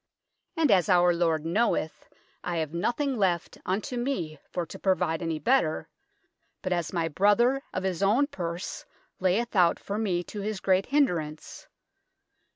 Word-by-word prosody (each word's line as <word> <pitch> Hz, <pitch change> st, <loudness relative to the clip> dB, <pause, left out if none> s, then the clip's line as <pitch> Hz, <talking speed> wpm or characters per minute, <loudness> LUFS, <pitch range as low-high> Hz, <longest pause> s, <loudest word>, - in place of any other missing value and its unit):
And 310 Hz, -7 st, +3 dB
ass 190 Hz, -1 st, +4 dB
our 175 Hz, -1 st, +5 dB
Lord 165 Hz, -2 st, 0 dB
knoweth, 170 Hz, -3 st, 0 dB, 0.3 s
I 175 Hz, -1 st, -2 dB
have 160 Hz, -2 st, -2 dB
nothyng 245 Hz, -, -1 dB
laft 180 Hz, -5 st, 0 dB
un 190 Hz, +3 st, 0 dB
to 250 Hz, -, -5 dB
me 180 Hz, -, -2 dB
for 175 Hz, -2 st, -3 dB
to -, -, -10 dB
provide 180 Hz, -4 st, +1 dB
any 165 Hz, -2 st, -2 dB
better, 215 Hz, -6 st, +1 dB, 0.7 s
but 185 Hz, -2 st, 0 dB
ass 170 Hz, -2 st, -2 dB
my 170 Hz, -3 st, 0 dB
brother 210 Hz, -, +3 dB
of 185 Hz, -, -3 dB
his 190 Hz, -1 st, -2 dB
own 215 Hz, +8 st, +4 dB
purs 175 Hz, -, -5 dB, 0.3 s
layeth 200 Hz, +6 st, 0 dB
out 175 Hz, -3 st, +4 dB
for 205 Hz, +2 st, -4 dB
me 180 Hz, -5 st, 0 dB
to 205 Hz, +3 st, -7 dB
his 210 Hz, 0 st, -3 dB
great 190 Hz, 0 st, +2 dB
hynderance. 170 Hz, -, -1 dB
185 Hz, 160 wpm, -27 LUFS, 170-215 Hz, 0.7 s, our